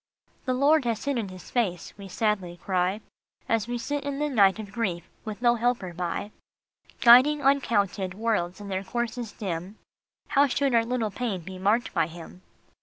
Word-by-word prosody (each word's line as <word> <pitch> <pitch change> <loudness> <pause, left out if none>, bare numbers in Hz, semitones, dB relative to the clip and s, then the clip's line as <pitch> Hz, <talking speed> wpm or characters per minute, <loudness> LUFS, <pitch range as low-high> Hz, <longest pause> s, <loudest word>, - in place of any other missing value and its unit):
The 255 - 0
Lord 285 +2 +4
has 230 -2 -2
hidden 240 -8 -1
his 185 -1 -11
face," 190 -9 -1
we 200 -1 -10
sadly 190 -3 -1
cry, 185 +3 -1 0.5
As 225 -1 +1
we 240 0 -2
sit 290 +4 -3
in 285 -1 -3
the 295 +1 -1
night 200 -7 +4
of 210 -2 -8
grief 185 -6 -2 0.2
with 215 +1 -7
no 240 0 +5
helper 235 -6 -1
by. 175 +4 -3 0.3
" - - -30
Guiding 260 +5 +7
uncounted 205 -9 +1
worlds 205 -5 -1
in 205 -1 -8
their 190 0 -2
courses 240 +1 -3
dim, 190 0 -5 0.5
How 285 0 +4
should 275 0 0
our 230 -1 +4
little 230 -3 -1
pain 210 -4 -3
be 185 +2 -9
marked 210 +6 +1
by 165 -2 +2
him?" 170 +2 -11
215 Hz, 180 wpm, -26 LUFS, 185-245 Hz, 0.5 s, Guiding